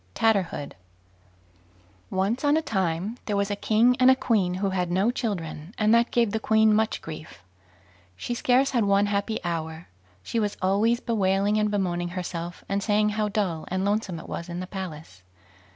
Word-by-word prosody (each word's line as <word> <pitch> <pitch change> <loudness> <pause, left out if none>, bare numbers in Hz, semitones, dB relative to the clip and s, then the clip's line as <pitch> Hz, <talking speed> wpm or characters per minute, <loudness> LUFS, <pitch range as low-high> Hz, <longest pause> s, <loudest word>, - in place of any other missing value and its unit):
TATTERHOOD 195 -10 0 1.4
Once 200 +8 -1
on 290 +1 +4
a - - +1
time 190 - -1
there 205 -2 0
was 200 0 0
a - - 0
king 225 +4 +3
and 255 0 +6
a 260 - +7
queen 200 -8 +1
who 195 +1 -1
had 180 -2 -1
no 190 +6 +2
children, 180 - -4
and 215 +1 +3
that 235 +1 +4
gave 235 -3 +2
the 220 - -1
queen 220 0 +4
much 220 +1 0
grief; 155 - -9 0.7
she 240 - -4
scarce 255 +3 +2
had 240 -4 +2
one 200 0 +3
happy 205 +2 -1
hour. 165 -1 -4 0.3
She 230 - -2
was 210 -2 -1
always 205 +5 +2
bewailing 205 -1 +1
and 210 0 +1
bemoaning 175 -4 -1
herself, 175 -1 -5
and 200 0 -1
saying 210 +1 +2
how 210 0 -1
dull 195 -7 -1
and 185 +1 -1
lonesome 205 -4 -1
it - - -11
was 170 +1 -6
in 175 0 -4
the 185 - -4
palace. 160 - -8
200 Hz, 180 wpm, -26 LUFS, 180-220 Hz, 1.4 s, a